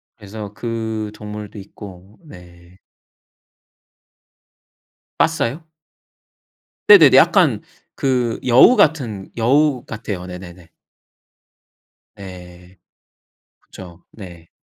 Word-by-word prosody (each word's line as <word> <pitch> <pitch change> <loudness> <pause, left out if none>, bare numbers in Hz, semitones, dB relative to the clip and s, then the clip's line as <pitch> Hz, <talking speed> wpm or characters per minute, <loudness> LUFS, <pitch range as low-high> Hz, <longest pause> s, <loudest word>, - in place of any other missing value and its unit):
그래서 105 -1 -10
그 110 -2 -5
동물도 105 0 -10
있고. 95 0 -14
네. 90 - -17 2.4
빠사요? 155 -1 -1 1.2
네네네. - - +7
약간 - - +3 0.4
그 125 -4 -1
여우 130 - +6
같은 115 -11 0
여우 130 +2 +1
같아요. 105 -5 -7
네네네. 90 -2 -12 1.4
네. 90 -2 -13 0.8
그쵸. 85 -2 -14
네. 85 -5 -13
105 Hz, 145 characters per minute, -18 LUFS, 90-115 Hz, 2.4 s, 네네네